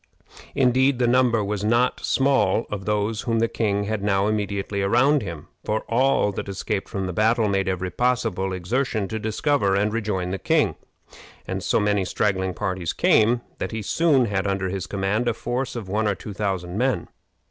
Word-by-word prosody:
Indeed, 130 +1 +3
the 125 - +2
number 120 -2 +3
was 100 0 -3
not 120 +4 +2
small 135 -6 +2
of 100 -2 -4
those 105 +1 0
whom 115 -1 -1
the 115 +1 +2
king 105 -3 -1
had 110 0 -2
now 100 -1 +1
immediately 100 -1 -1
around 125 +9 +3
him, 85 -7 -7 0.2
for 110 +1 -1
all 125 -3 +2
that 100 - -5
escaped 100 +1 -3
from 95 -1 -3
the 90 - -4
battle 110 +3 +2
made 95 -1 0
every 95 0 -2
possible 95 -4 0
exertion 105 +3 -1
to 110 - -3
discover 110 -1 +1
and 105 +2 +1
rejoin 105 -5 -2
the 95 - -3
king, - - +2 0.7
and - - -3
so - - +1
many 105 -1 +1
straggling 95 -1 -1
parties 95 -3 -2
came 115 +3 +3 0.2
that - - -3
he 110 -1 -3
soon 145 - +3
had 100 -2 -1
under 95 -1 -1
his 95 -1 -4
command 100 +4 -1
a 115 - +1
force 125 +2 -3
of 115 -5 -5
one 105 +3 0
or 105 - +1
two 105 - -8
thousand 95 -2 -2
men. 125 -10 0
105 Hz, 185 wpm, -23 LUFS, 95-120 Hz, 0.7 s, Indeed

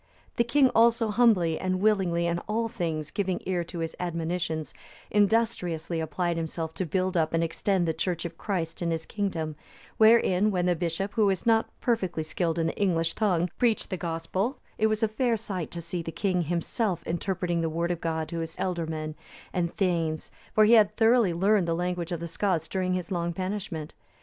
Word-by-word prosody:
The 235 - +4
king 260 +3 +4
also 230 0 +4
humbly 205 -8 +3
and 185 0 -1
willingly 190 -5 +2
in 170 0 0
all 225 +2 0
things 160 -8 -3
giving 190 -3 -1
ear 180 -2 0
to 170 - -8
his 165 -1 -3
admonitions, 165 -2 -2 0.4
industriously 195 -6 +1
applied 165 +2 -1
himself 160 0 -3
to 175 +2 -3
build 185 +3 0
up 160 -2 +1
and 165 - +2
extend 175 +2 0
the 160 - +1
Church 175 0 -2
of 170 -1 -5
Christ 170 -4 -3
in 170 - 0
his 165 -1 -2
kingdom; 165 -7 -2 0.4
wherein, 220 -3 +5
when 180 -3 0
the 180 -1 +3
bishop, 170 +4 -2
who 215 -2 +3
was 190 -2 0
not 225 -1 +3
perfectly 190 -10 0
skilled 165 +1 -1
in 165 - +1
the 165 - -3
English 165 -4 +1
tongue, 180 -5 +1
preached 235 -4 +1
the - - 0
Gospel, 175 - -2 0.2
it 220 - +4
was 215 0 0
a - - +5
fair 230 +2 0
sight 195 -6 -4
to 170 -1 -6
see 170 +1 -3
the 165 - -5
king 185 0 0
himself 175 - -1
interpreting 175 0 -1
the 165 - 0
Word 170 +2 -1
of 175 - -3
God 160 -1 -1
to 170 - -3
his 165 0 -5
ealdormen 160 -4 -2 0.4
and 170 -2 -1
thegns, 165 -5 0 0.2
for 215 - +7
he 225 - +5
had 215 -2 +5
thoroughly 225 -3 +4
learned 190 +2 +2
the 165 - +1
language 180 0 -2
of 170 -2 -3
the 170 - -3
Scots 165 -1 -1
during 185 -1 -1
his 185 +2 -4
long 170 -1 -1
banishment. 185 -4 -4
180 Hz, 195 wpm, -27 LUFS, 165-205 Hz, 0.4 s, for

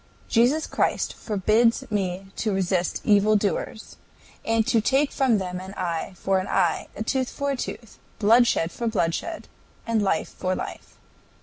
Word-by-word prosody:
"Jesus 250 +7 +3
Christ - - 0
forbids 225 +4 +2
me 195 -1 -2
to 220 - 0
resist 185 -1 0
evil 210 +1 +4
doers, 205 +1 -2 0.5
and 225 -1 +1
to 225 -1 +2
take 275 +5 +2
from 260 -5 +2
them 180 -2 -4
an 190 +2 -9
eye 175 +1 -3
for 190 +1 +1
an 185 - -4
eye, 175 -4 +1
a 220 - -3
tooth 260 +2 -1
for 280 0 -2
a - - -1
tooth, 235 -3 -7 0.2
bloodshed 225 -6 +4
for 235 - -3
bloodshed, 220 - -2 0.4
and 230 -2 +1
life 190 -5 0
for 185 0 -2
life. - - -7
210 Hz, 155 wpm, -25 LUFS, 185-235 Hz, 0.5 s, evil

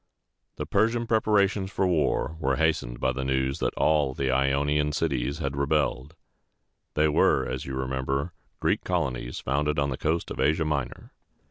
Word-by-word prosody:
The - - -4
Persian 115 +1 +1
preparations 105 -3 +2
for 95 - 0
war 80 -2 +1
were 70 -4 +1
hastened 65 -6 0
by 65 - +1
news 65 +1 -1
that - - -1
all 75 -4 +2
the 65 -1 0
Ionian 70 +3 +1
cities 70 -2 -1
had 70 -4 -3
rebelled. 70 0 0 0.8
These 75 0 +3
were, 75 - +3
as 65 +1 -4
you 65 - -4
remember, 65 +5 -2 0.3
Greek - - +1
colonies 65 -9 -2
founded 75 +3 0
on 70 -1 +1
the 65 - -3
coast 80 +2 -1
of - - -6
Asia 80 +4 +2
Minor. 70 -4 -3
70 Hz, 155 wpm, -26 LUFS, 65-80 Hz, 0.8 s, These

